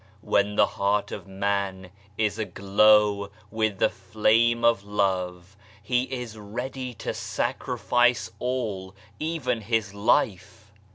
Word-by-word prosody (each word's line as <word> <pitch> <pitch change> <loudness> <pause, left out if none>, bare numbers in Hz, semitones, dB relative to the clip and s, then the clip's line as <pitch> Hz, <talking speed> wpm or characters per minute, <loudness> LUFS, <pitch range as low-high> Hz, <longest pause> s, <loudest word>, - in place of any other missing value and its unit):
When 100 +1 +1
the - - +6
heart 100 +1 0
of - - -7
man 95 -1 -2 0.3
is 110 -1 0
aglow 105 0 +3 0.2
with 110 -2 0
the - - +2
flame 115 +2 +2
of 115 -4 +3
love, 95 -2 -2 0.3
he 125 +3 +1
is 125 -4 -6
ready 125 +4 -5
to - - -4
sacrifice 120 0 0
all 110 -7 -3 0.2
even 150 -8 -1
his 110 -2 -1
life. 100 0 0
105 Hz, 115 wpm, -26 LUFS, 100-115 Hz, 0.3 s, the